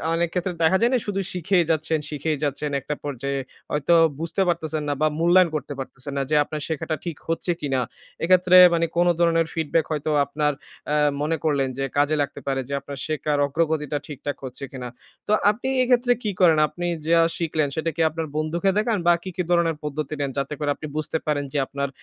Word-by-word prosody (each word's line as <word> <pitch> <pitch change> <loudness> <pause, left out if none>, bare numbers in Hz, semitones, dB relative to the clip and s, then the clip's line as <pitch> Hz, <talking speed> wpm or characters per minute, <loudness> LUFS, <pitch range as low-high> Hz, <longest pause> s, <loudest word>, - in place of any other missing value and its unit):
অনেক 170 +1 +1
ক্ষেত্রে 180 0 -1
দেখা 160 +4 +5
যায় 235 - +4
না - - +4
শুধু 195 -1 -1
শিখেই 180 0 +2
যাচ্ছেন, 155 0 0
শিখেই 150 0 -2
যাচ্ছেন, 145 +1 -1
একটা 150 - -4
পর্যায়ে 140 0 -3 0.3
হয়তো 150 +3 +2 0.3
বুঝতে 165 +3 -2
পারতেছেন 160 -3 -1
না - - +1
বা 155 - +5
মূল্যায়ন 175 +1 +5
করতে 150 -1 -4
পারতেছেন 135 +1 -7
না। - - +1
যে 155 - +2
আপনার 155 +1 -6
শেখাটা 160 0 -2
ঠিক 165 -4 -4
হচ্ছে 170 +1 0
কিনা। 135 -3 0 0.4
এক্ষেত্রে 185 +1 +5 0.2
মানে 170 0 +2
কোন 175 +1 +4
ধরনের 165 -1 +3
ফিডব্যাক 160 0 0
হয়তো 155 0 -1
আপনার 150 +1 0 0.3
অ্যা 150 - +1 0.2
মনে 160 +2 0
করলেন 140 -4 +1
যে 135 - -1
কাজে 145 +2 +3
লাগতে 140 - -3
পারে 135 -1 0
যে 140 - -3
আপনার 140 - -8
শেখার 150 -1 -1
অগ্রগতিটা 150 0 -1
ঠিকঠাক 145 -1 -5
হচ্ছে 130 +2 -7
কিনা? 125 -2 -6 0.4
তো - - -1 0.2
আপনি 240 +5 -6 0.2
এক্ষেত্রে 245 0 +3
কি 210 - 0
করেন? 165 -4 +6
আপনি 175 +3 -6 0.2
যা 170 - +5 0.2
শিখলেন 155 -3 0
সেটা 160 +1 -1
কি 165 - -1
আপনার 160 +1 -4
বন্ধুকে 170 +5 0
দেখান 215 +1 +1
বা 175 - +7
কি, 190 - -5
কি, - - -1
ধরনের 170 -2 +3
পদ্ধতি 150 0 -4
নেন 140 -1 -1
যাতে 140 +2 -2
করে 150 - -1
আপনি 155 - -7
বুঝতে 155 +1 -1
পারেন 145 -2 0
যে 145 - 0
আপনার 140 0 -3
155 Hz, 200 wpm, -23 LUFS, 145-170 Hz, 0.4 s, বা